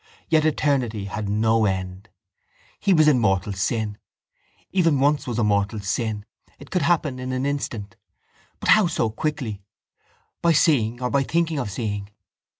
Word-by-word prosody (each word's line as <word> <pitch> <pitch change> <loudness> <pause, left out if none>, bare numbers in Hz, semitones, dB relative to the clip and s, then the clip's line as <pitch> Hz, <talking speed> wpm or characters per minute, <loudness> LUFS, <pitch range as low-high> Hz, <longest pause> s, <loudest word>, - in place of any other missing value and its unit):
Yet 155 -1 +3
eternity 130 -9 0
had 105 0 -4
no 110 +1 +2
end. 95 +1 -3 0.7
He 200 - +1
was 155 -4 +5
in 140 -5 +5
mortal 95 -2 +1
sin. 105 +2 -2 0.7
Even 165 -7 +2
once 145 +1 +2
was 120 -3 -3
a 120 - +2
mortal 105 +1 +1
sin. 105 +1 -2 0.3
It 140 - -14
could 180 - +1
happen 155 -6 +1
in 130 0 -4
an 130 +1 -1
instant. 120 -8 -3 0.6
But - - -3
how 215 -4 +6
so 115 -9 -1
quickly? 125 -5 -3 0.8
By 170 -1 +4
seeing 125 -6 +2
or 125 - -1
by 140 - +3
thinking 160 +2 0
of 120 -6 -3
seeing. 100 -1 -4
120 Hz, 155 wpm, -23 LUFS, 105-145 Hz, 0.8 s, how